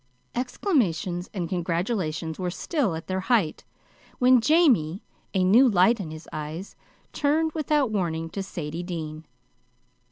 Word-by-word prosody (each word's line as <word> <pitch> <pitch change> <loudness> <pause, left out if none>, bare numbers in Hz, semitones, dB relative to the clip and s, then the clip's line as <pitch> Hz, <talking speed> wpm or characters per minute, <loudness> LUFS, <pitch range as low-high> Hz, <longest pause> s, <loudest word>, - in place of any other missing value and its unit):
Exclamations 195 - -1
and 180 -5 -3
congratulations 170 -2 -2
were 180 -1 -1
still 230 - -1
at 160 - -7
their 185 0 -2
height, 195 -5 +1 0.5
when 250 -1 +5
Jamie, 230 - +3 0.3
a 185 - +3
new 235 +8 +6
light 210 +3 +4
in 180 -6 -5
his 155 +1 -9
eyes, 155 +5 -6 0.4
turned 315 +2 +1
without 300 -5 +1
warning 165 -5 -1
to 200 - -4
Sadie 170 -3 -5
Dean. 160 -3 -6
185 Hz, 130 wpm, -26 LUFS, 165-245 Hz, 0.5 s, new